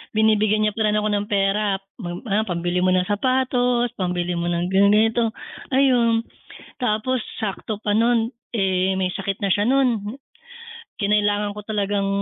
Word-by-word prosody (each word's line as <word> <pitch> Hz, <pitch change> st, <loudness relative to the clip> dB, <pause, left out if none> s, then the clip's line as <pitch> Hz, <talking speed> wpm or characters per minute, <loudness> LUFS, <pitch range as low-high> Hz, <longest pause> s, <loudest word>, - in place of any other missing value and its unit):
binibigyan 215 Hz, -1 st, +3 dB
niya 210 Hz, -, +2 dB
pa 215 Hz, +1 st, 0 dB
rin 210 Hz, -, +1 dB
ako 210 Hz, 0 st, 0 dB
ng 205 Hz, 0 st, -1 dB
pera, 200 Hz, 0 st, +1 dB
ah, 195 Hz, +2 st, -4 dB
pambili 175 Hz, 0 st, -1 dB
mo 185 Hz, 0 st, +2 dB
ng 180 Hz, -, +2 dB
sapatos, 245 Hz, +3 st, +1 dB
pambili 180 Hz, -1 st, -1 dB
mo 170 Hz, 0 st, -2 dB
ng 175 Hz, +1 st, -1 dB
ganito, 220 Hz, +4 st, +3 dB, 0.4 s
ayun, 240 Hz, -4 st, +3 dB, 0.5 s
tapos 245 Hz, +1 st, 0 dB, 0.2 s
sakto 215 Hz, 0 st, -4 dB
pa 205 Hz, -1 st, 0 dB
nun, 230 Hz, 0 st, +2 dB, 0.2 s
eh, 190 Hz, -3 st, +1 dB
may 190 Hz, -1 st, 0 dB
sakit 195 Hz, 0 st, -4 dB
na 200 Hz, -, 0 dB
siya 205 Hz, +2 st, +2 dB
nun, 250 Hz, -4 st, +2 dB, 1.0 s
kinailangan 205 Hz, 0 st, +1 dB
ko -, -, -5 dB
talagang, 205 Hz, -2 st, -1 dB
210 Hz, 145 wpm, -22 LUFS, 195-225 Hz, 1.0 s, binibigyan